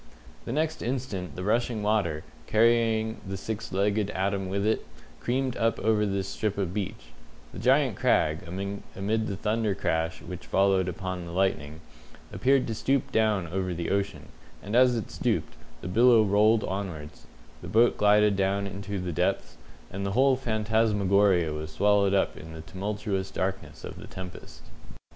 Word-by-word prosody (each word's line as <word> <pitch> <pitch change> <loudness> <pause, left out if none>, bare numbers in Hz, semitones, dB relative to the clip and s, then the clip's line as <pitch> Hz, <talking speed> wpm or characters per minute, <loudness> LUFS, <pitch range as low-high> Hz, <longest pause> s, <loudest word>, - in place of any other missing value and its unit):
The - - -4
next 155 +4 -1
instant 120 -8 -3
the 90 - -5
rushing 115 +1 0
water, 100 -8 0 0.2
carrying 110 0 +2
the 95 0 -5
six 110 +2 -5
legged 100 +2 +1
atom 95 0 -1
with 100 +1 -1
it, 110 - +1 0.4
creamed 130 0 -1
up 115 0 +1
over 110 -1 +2
this 95 -1 -2
strip 105 +1 -2
of 95 -3 -2
beach; 105 +1 -5 0.4
the - - -7
giant - - +3
crag, 80 +1 +2
amid 100 +3 -4 0.5
the 100 - -3
thunder 105 0 0
crash 80 -3 -1
which 90 -1 -8
followed 95 -1 +3
upon 90 0 -4
the - - -7
lightning, 80 -4 -1 0.5
appeared 135 0 +3
to 115 - -3
stoop 135 +4 0
down 110 -4 +2
over 95 0 -2
the 85 0 -3
ocean, 100 0 -2 0.3
and 105 +3 -3
as 125 0 +5
it 110 - -5
stooped, - - -1 0.3
the - - -6
billow 115 +4 +5
rolled 105 +2 +4
onwards, 90 -6 -5 0.3
the - - -8
boat 115 +2 +4
glided 105 0 +4
down 100 +1 0
into 100 +1 -5
the 90 -1 -3
depths, - - -1 0.4
and 95 +2 -4
the 100 0 -2
whole 135 +3 +4
phantasmagoria 105 -7 +2
was 75 +1 -5
swallowed 100 +3 +3
up 95 - +1
in 80 +1 -10
the 80 - -8
tumultuous 100 +2 -3
darkness 95 +1 -4
of - - -7
the - - -10
tempest. 90 -1 -10
100 Hz, 160 wpm, -27 LUFS, 95-110 Hz, 0.5 s, as